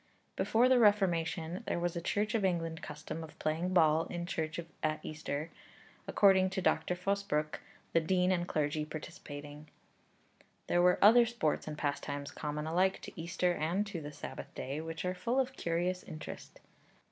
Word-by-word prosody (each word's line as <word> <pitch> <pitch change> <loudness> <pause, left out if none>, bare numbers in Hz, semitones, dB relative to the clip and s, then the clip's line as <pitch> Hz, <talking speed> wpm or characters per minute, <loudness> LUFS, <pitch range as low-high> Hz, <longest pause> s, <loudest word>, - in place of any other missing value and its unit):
Before 235 +3 +3
the 255 -1 +5
Reformation 180 -5 +2
there - - 0
was 175 0 -1
a 170 - -2
Church 210 +4 0
of 225 -3 +1
England 165 -2 0
custom 155 +2 -6
of 160 - -11
playing 165 +4 -1
ball 160 -3 +4
in 175 0 -4
church 160 -1 -3 0.2
at 155 0 0
Easter, 155 0 -4 0.6
according 190 -2 +5
to 195 +1 -3
Dr. 180 -1 +1
Fosbrooke, 180 -5 -1 0.3
the 165 - +5
dean 180 +3 +2
and 175 -1 0
clergy 150 -1 0
participating. 150 -1 -8 1.0
There 175 - +2
were 180 0 +5
other 235 +3 +8
sports 220 -12 -1
and 150 -1 -5
pastimes 145 -1 -3
common 150 0 -4
alike 185 +4 +2
to - - -8
Easter 175 +1 0
and 175 +6 0
to 195 -5 -5
the 145 0 -6
Sabbath - - -8
day, 140 +4 -4
which 165 +1 -5
are 180 - 0
full 235 +8 0
of 265 0 0
curious 175 -1 -1
interest. 155 - -9
170 Hz, 165 wpm, -33 LUFS, 155-190 Hz, 1.0 s, other